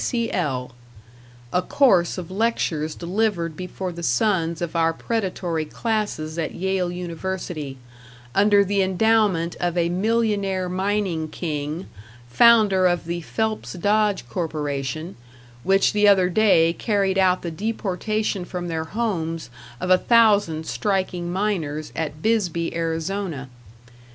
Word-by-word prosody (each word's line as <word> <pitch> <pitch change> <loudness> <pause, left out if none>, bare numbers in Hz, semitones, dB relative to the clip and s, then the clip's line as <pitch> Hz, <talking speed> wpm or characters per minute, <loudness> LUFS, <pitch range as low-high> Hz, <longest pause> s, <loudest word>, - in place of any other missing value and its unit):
D., - - -2
D.C.L. 150 - -1 0.8
a 180 - +3
course 190 -9 +3
of 180 -1 -6
lectures 185 -7 -1
delivered 175 -3 -1
before 185 +1 -5
the 170 0 -8
sons 165 - +1
of 175 -1 -4
our 165 0 +2
predatory 180 -6 -2
classes 170 -4 -3
at 160 - -3
Yale 190 -1 -1
University, 175 -5 -5 0.6
under 205 +2 +4
the 200 +1 +1
endowment 190 -3 +2
of 175 0 -1
a 170 -1 +2
millionaire 200 -1 0
mining 185 -3 -1
king, 155 +1 -4 0.4
founder 200 - +5
of 175 -2 0
the 170 +1 -3
Phelps 220 +5 -2
Dodge 205 - +1
corporation, 150 +2 -3 0.5
which 195 +1 +3
the 210 0 +4
other 190 -3 +5
day 175 -5 +4
carried 195 -1 0
out 185 -1 +3
the 170 - -3
deportation 210 +1 -2
from 175 -1 -5
their 160 -1 -2
homes 165 - -3 0.3
of 180 - -1
a 185 - +6
thousand 205 -9 +3
striking 185 -2 -1
miners 170 -6 -2
at 155 -1 -4
Bisbee, 180 -8 0
Arizona. 165 -3 -3
180 Hz, 125 wpm, -23 LUFS, 165-205 Hz, 0.8 s, a